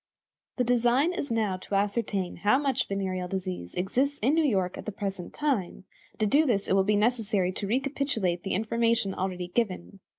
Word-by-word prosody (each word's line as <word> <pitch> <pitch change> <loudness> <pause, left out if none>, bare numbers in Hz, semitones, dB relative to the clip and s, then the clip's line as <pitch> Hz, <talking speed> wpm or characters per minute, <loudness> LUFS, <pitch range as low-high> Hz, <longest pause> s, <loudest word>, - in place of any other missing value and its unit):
The 250 - +2
design 245 +7 +3
is 290 - -3
now 215 -5 0
to 190 +2 -5
ascertain 200 -2 -1
how 205 +7 +3
much 270 -2 0
venereal 190 -2 -2
disease 185 - -5
exists 260 +10 0
in 265 +6 +4
New 325 0 +3
York 190 -10 +1
at - - -9
the - - -1
present 195 -3 -5
time, 260 -13 -1 0.3
and - - -30
to 215 - +2
do 290 +8 +4
this 200 -5 +1
it - - +1
will 195 0 +4
be 210 +2 +2
necessary 210 -4 +1
to 200 +2 -4
recapitulate 250 -7 0
the 195 - -2
information 230 -1 +1
already 180 -2 -3
given. 195 -2 -2
205 Hz, 190 wpm, -28 LUFS, 190-245 Hz, 0.3 s, in